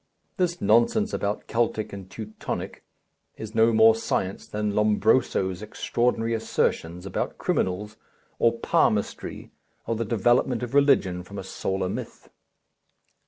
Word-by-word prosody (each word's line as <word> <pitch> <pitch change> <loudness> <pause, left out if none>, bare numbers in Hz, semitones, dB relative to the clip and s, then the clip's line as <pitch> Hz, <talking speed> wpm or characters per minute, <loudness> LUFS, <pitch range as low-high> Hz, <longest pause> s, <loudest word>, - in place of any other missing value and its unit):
This 175 -2 0
nonsense 120 - +3
about 100 +1 -2
Keltic 115 -2 -1
and 95 -2 -8
Teutonic 110 +2 -6 0.5
is 110 -1 -7
no 115 +1 +4
more 110 0 +6
science 100 -4 -2
than 105 -1 -2
Lombroso's 105 -2 +2
extraordinary 115 +2 -1
assertions 90 -5 -1
about 95 - -3
criminals, 105 +4 -1 0.4
or 115 0 +3
palmistry, - - 0 0.3
or 115 - -1
the 115 - -1
development 120 +2 +2
of 125 - -5
religion 135 -11 +3
from 100 +3 -10
a 95 - -5
solar 95 0 -2
myth. 95 - -7
110 Hz, 120 wpm, -25 LUFS, 100-115 Hz, 0.5 s, more